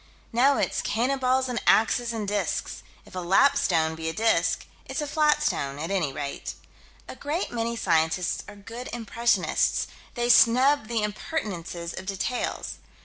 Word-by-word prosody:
Now 270 +4 +4
it's - - 0
cannon 255 +5 0
balls 260 0 +2
and 245 -2 -2
axes 235 +2 +4
and 220 -3 -3
disks 205 0 -2 0.2
if - - -16
a 185 - -4
"lapstone" 175 - +3
be 160 0 -4
a - - -4
disk 225 +3 +1 0.2
it's - - -3
a 300 - -1
flat 300 0 +2
stone, 140 - -1
at 160 +5 -4
any 175 -8 0
rate. 140 +1 -5 0.5
A - - -8
great 305 +6 -3
many 235 0 -2
scientists 165 -3 +1
are 210 - -10
good 230 +5 -8
impressionists: 235 -3 +1 0.3
they 240 -1 0
snub 250 +2 +5
the 230 -2 -1
impertinences 185 - -4
of 190 - -8
details. 200 +5 -3
225 Hz, 155 wpm, -26 LUFS, 180-250 Hz, 0.5 s, snub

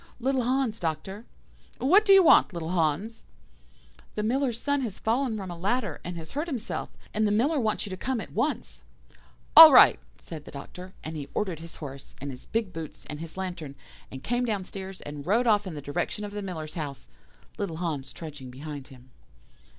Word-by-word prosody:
"'Little 260 +1 +1
Hans, 250 -2 0
Doctor.' 190 +6 -4 0.5
"'What 380 +11 +5
do 400 - +5
you 390 -1 +9
want, 315 - +6
little 165 -1 -4
Hans?' 180 +6 -1 0.9
"'The 210 - -1
Miller's 245 +1 0
son 285 +1 0
has 225 -7 -4
fallen 235 0 0
from 190 -3 -6
a - - -6
ladder, 200 - -1
and 175 0 -5
has 160 -1 -8
hurt 300 +4 -2
himself, 250 -8 -4 0.2
and 215 0 +2
the - - +1
Miller 275 +9 +2
wants 220 -3 0
you 200 - -7
to 185 - -4
come 255 +5 -2
at - - -7
once.' 255 +8 -2 0.7
"'All 320 -1 +13
right!' 260 - +8 0.2
said 155 -3 -9
the - - -10
Doctor; 180 +6 -9
and 160 +1 -6
he 145 -2 -6
ordered 185 -6 -1
his 165 0 -10
horse, 140 -3 -9
and 140 +1 -5
his 125 0 -12
big 220 -5 -2
boots, 160 -2 -8
and 150 - -6
his 165 +2 -7
lantern, 175 -7 -5 0.4
and 130 0 -8
came 245 +1 0
downstairs, 195 -3 -4
and 145 +1 -8
rode 230 +6 +3
off 205 -3 +3
in 170 - -6
the 145 - -6
direction 175 +8 -3
of 205 - -7
the 205 0 -5
Miller's 160 -6 -6
house, 145 - -6 0.5
little 175 -6 -3
Hans 150 -6 -3
trudging 145 -5 -9
behind 140 +1 -8
him. 130 -1 -16
190 Hz, 195 wpm, -27 LUFS, 155-230 Hz, 0.9 s, All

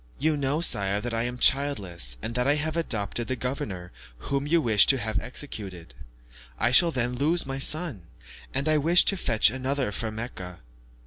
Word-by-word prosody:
"You 155 +1 +1
know, 145 +2 -1
sire, 100 - +2
that 120 +2 -4
I 115 +1 0
am 125 0 -4
childless, 95 - +1
and 115 - -4
that 125 +2 0
I 145 - +4
have 155 +1 -2
adopted 120 -7 -1
the 130 - -1
governor 105 -8 -5 0.3
whom 140 - -3
you 170 +3 +3
wish 110 -8 +4
to 135 - +5
have 110 -3 -1
executed; 95 - -7 0.6
I 120 +2 +2
shall 170 +7 +6
then 125 -5 -1
lose 155 +7 +1
my 135 0 -4
son, 145 - +1 0.4
and 140 - -1
I 155 -1 +3
wish 170 +5 +4
to 200 - +1
fetch 110 - +2
another 130 -2 -2
from 110 +1 -3
Mecca." 95 -6 -7
125 Hz, 185 wpm, -26 LUFS, 110-145 Hz, 0.6 s, shall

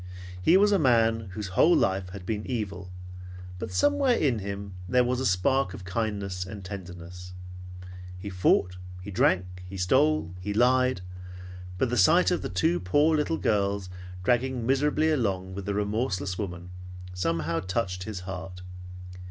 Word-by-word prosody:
He 170 - +5
was 205 +1 +4
a 200 - +4
man 115 - +2
whose 105 -1 -5
whole 160 - +4
life 95 -1 +1
had 95 -1 -9
been 105 +1 -2
evil, 100 -6 -4 0.7
but - - -5
somewhere 285 -3 +3
in 130 - +1
him 100 0 -6 0.2
was 125 0 +2
a 130 - +1
spark 95 +3 +1
of 95 - -10
kindness 100 -2 -2
and 100 +1 -9
tenderness. 90 -1 -8 0.8
He 95 +3 -8
fought, 90 0 +2 0.3
he 100 - -7
drank, 90 -1 +1
he 95 - -7
stole, 80 -2 +2
he 100 +3 -4
lied; 125 -2 +3 0.8
but 120 +4 0
the 125 - 0
sight 170 - +5
of 180 - 0
the - - -4
two 90 -2 +1
poor 145 - +3
little 155 +2 0
girls 100 -3 0 0.3
dragging 125 +2 +1
miserably 150 +4 +2
along 95 -9 -1
with 100 +1 -6
the 100 - -1
remorseless 100 -3 -1
woman 90 -3 -6 0.4
somehow 85 -2 -1
touched 90 -1 -2
his 105 -4 -5
heart. 90 0 -7
100 Hz, 150 wpm, -27 LUFS, 90-125 Hz, 0.8 s, He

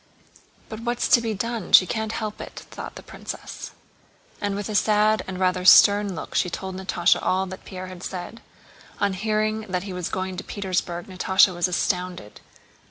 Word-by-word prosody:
"But 220 - -7
what's 240 +1 -1
to 240 - +6
be 225 -2 -2
done? 230 0 -4
She 185 - +9
can't 220 +3 -3
help 215 -2 -4
it," - - -9
thought - - -8
the - - -10
princess. - - -8 0.7
And 205 -1 -1
with 205 0 -4
a 215 - -4
sad 215 +1 +3
and 185 - -5
rather 185 -1 +1
stern 200 +1 +7
look - - -7
she 180 - +1
told 190 +2 -5
Natásha 185 -2 +2
all 190 +1 +1
that 185 0 -9
Pierre 185 -1 -7
had 185 -1 -10
said. 185 +5 -6 0.6
On 200 -1 +1
hearing 215 +2 0
that 180 0 -1
he 195 -2 -6
was 180 -2 -3
going 185 -1 -3
to - - -5
Petersburg 185 -3 -3
Natásha 190 0 +3
was 175 +1 +1
astounded. 180 - -2
190 Hz, 180 wpm, -24 LUFS, 185-215 Hz, 0.7 s, She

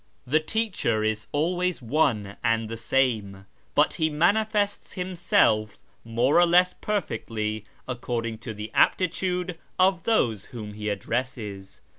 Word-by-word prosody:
The 150 +5 +3
teacher 170 - -1
is 110 -1 -1
always 175 +4 0
one 115 -6 0
and 115 -1 +1
the 115 - -4
same, 110 -5 0 0.3
but - - +4
he 160 - +3
manifests 205 +6 +1
himself 175 - +1 0.3
more 120 +7 +2
or 175 - +6
less 180 +1 +4
perfectly 110 - -3 0.2
according 120 -3 -3
to 115 -1 -7
the 105 +1 -6
aptitude 180 -1 +1 0.2
of 185 -2 +3
those 115 - +1
whom 110 -5 -8
he 105 0 -4
addresses. 105 -2 -4
125 Hz, 125 wpm, -26 LUFS, 110-180 Hz, 0.3 s, or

